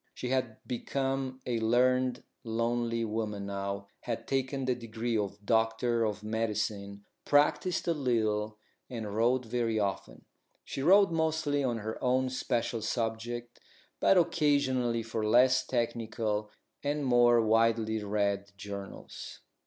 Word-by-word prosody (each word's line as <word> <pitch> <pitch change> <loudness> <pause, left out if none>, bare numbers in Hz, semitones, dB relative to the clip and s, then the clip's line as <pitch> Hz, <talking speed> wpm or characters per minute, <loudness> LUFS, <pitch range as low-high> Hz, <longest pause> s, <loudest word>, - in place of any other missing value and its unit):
She 125 - -4
had 130 -4 -1
become 135 +1 -2
a 120 -2 -1
learned, 125 +2 +2 0.2
lonely 115 0 -1
woman 105 -2 -3
now, 100 0 -4
had 115 -2 -5
taken 135 0 -1
the 130 - +2
degree 115 0 -3
of 100 -1 -3
doctor 115 +1 +2
of 105 0 -3
medicine, 105 -2 -2 0.2
practised 150 +6 +2
a 170 - +3
little, 110 -6 0 0.3
and 110 -5 -5
wrote 120 +3 +2
very 115 -1 -1
often. 95 - -3 0.4
She 135 - -5
wrote 195 +5 +6
mostly 160 -3 0
on 120 -3 0
her 110 +3 -5
own 130 0 +2
special 120 -2 -1
subject, 120 +1 -3 0.4
but 195 - +5
occasionally 130 -8 +2
for 115 -1 -3
less 125 +4 +5
technical 110 -3 -1 0.3
and 145 0 -1
more 120 -1 +5
widely 110 -1 +2
read 100 -1 -1
journals. 100 -1 -8
115 Hz, 125 wpm, -30 LUFS, 110-130 Hz, 0.4 s, wrote